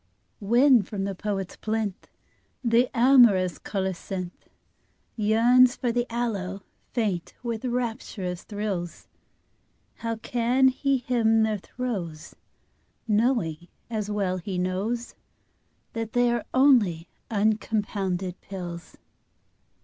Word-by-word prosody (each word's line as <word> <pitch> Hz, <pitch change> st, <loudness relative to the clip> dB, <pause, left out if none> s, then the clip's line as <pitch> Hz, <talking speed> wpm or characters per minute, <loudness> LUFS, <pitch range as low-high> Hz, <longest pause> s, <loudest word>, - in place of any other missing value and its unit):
When 240 Hz, +4 st, +5 dB
from 195 Hz, 0 st, -5 dB
the 195 Hz, 0 st, -2 dB
poet's 195 Hz, -1 st, -4 dB
plinth 215 Hz, -3 st, -3 dB, 0.6 s
The 235 Hz, +1 st, +3 dB
amorous 235 Hz, -8 st, +5 dB
colocynth 190 Hz, -2 st, -4 dB, 0.7 s
Yearns 240 Hz, +4 st, +5 dB
for 245 Hz, -3 st, -1 dB
the 240 Hz, +1 st, 0 dB
aloe, 200 Hz, -5 st, -3 dB, 0.3 s
faint 205 Hz, -8 st, -2 dB
with 235 Hz, 0 st, -3 dB
rapturous 225 Hz, -7 st, -3 dB
thrills, 200 Hz, -5 st, -4 dB, 0.9 s
How 230 Hz, 0 st, -3 dB
can 245 Hz, +3 st, +2 dB
he 275 Hz, +1 st, +1 dB
hymn 230 Hz, -3 st, +2 dB
their 215 Hz, -2 st, 0 dB
throes 180 Hz, -10 st, -5 dB, 0.7 s
Knowing, 210 Hz, -, +1 dB, 0.2 s
as 210 Hz, -2 st, -2 dB
well 195 Hz, -3 st, -1 dB
he 185 Hz, +1 st, -4 dB
knows, 195 Hz, +7 st, -2 dB, 0.8 s
That 225 Hz, -1 st, -4 dB
they 245 Hz, 0 st, +3 dB
are 235 Hz, -1 st, -1 dB
only 225 Hz, -, +4 dB, 0.2 s
uncompounded 205 Hz, -4 st, -1 dB
pills? 175 Hz, -3 st, -8 dB
215 Hz, 100 wpm, -26 LUFS, 190-240 Hz, 0.9 s, When